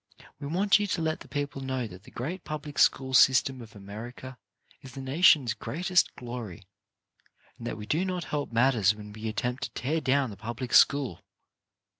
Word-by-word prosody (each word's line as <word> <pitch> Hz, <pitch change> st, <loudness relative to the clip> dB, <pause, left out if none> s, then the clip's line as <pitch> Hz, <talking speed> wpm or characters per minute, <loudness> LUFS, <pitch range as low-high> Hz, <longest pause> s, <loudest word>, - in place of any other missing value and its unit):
We 140 Hz, -, -6 dB
want 195 Hz, +6 st, +3 dB
you 205 Hz, -, -1 dB
to 170 Hz, -, -1 dB
let 160 Hz, 0 st, -1 dB
the -, -, -12 dB
people 145 Hz, -1 st, -4 dB
know 130 Hz, -2 st, -2 dB
that 95 Hz, -1 st, -11 dB
the -, -, -13 dB
great 165 Hz, +10 st, -5 dB
public 150 Hz, -1 st, -6 dB
school 130 Hz, -1 st, +3 dB
system 130 Hz, 0 st, +5 dB
of 115 Hz, -2 st, -13 dB
America 115 Hz, +5 st, -9 dB, 0.4 s
is 135 Hz, -1 st, -12 dB
the 135 Hz, -, -8 dB
nation's 135 Hz, -2 st, +4 dB
greatest 180 Hz, +3 st, 0 dB
glory, 120 Hz, -7 st, -7 dB, 1.0 s
and 120 Hz, -, -6 dB
that 115 Hz, -, -4 dB
we 105 Hz, -, -7 dB
do 160 Hz, +10 st, 0 dB
not 180 Hz, -2 st, -2 dB
help 145 Hz, -4 st, -3 dB
matters 115 Hz, -4 st, +3 dB
when 105 Hz, -1 st, -10 dB
we 110 Hz, +1 st, -6 dB
attempt 125 Hz, +4 st, -3 dB
to -, -, -3 dB
tear 155 Hz, +5 st, -1 dB
down 135 Hz, -3 st, +1 dB
the 100 Hz, -, -10 dB
public 120 Hz, +4 st, -6 dB
school. 140 Hz, -, +4 dB
130 Hz, 185 wpm, -28 LUFS, 115-150 Hz, 1.0 s, system